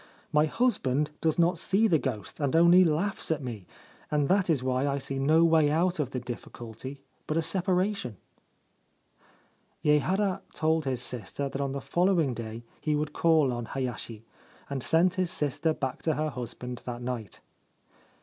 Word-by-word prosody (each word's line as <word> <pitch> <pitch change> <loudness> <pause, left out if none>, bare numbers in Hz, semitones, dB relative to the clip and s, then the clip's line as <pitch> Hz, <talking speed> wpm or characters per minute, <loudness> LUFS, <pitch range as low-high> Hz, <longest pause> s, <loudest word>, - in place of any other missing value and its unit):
My 150 +1 +4
husband 150 - +1
does 160 -2 +1
not 170 0 +3
see 200 +6 +2
the 165 -7 +3
ghost, 110 -10 -4
and 145 0 0
only 170 +2 +7
laughs 175 +5 0
at 160 -3 0
me; 110 -7 -6 0.4
and 145 -2 +1
that 190 -1 +3
is 145 -6 +2
why 130 +1 +1
I 140 0 0
see 135 0 -3
no 155 +4 +4
way 160 -3 +4
out 175 +3 +1
of 140 -4 0
the 130 - -3
difficulty 120 +2 -8 0.3
but 155 - 0
a - - +3
separation.' 185 - 0 1.7
Yehara 185 +7 +2
told 160 -1 +1
his 130 -2 -1
sister 125 +4 -4
that 135 - -4
on 135 -1 -2
the 140 - -4
following 175 -6 +2
day 115 0 -6 0.2
he 155 -1 0
would 150 0 -2
call 155 -6 +3
on 120 -1 -4
Hayashi, 120 -3 -4 0.5
and 135 -2 -2
sent 170 +7 +3
his 180 - 0
sister 150 +2 0
back 135 -4 -3
to 160 -2 0
her 155 0 -1
husband 125 -1 -6
that 120 -1 -5
night. 120 -6 -5
150 Hz, 170 wpm, -28 LUFS, 125-165 Hz, 1.7 s, only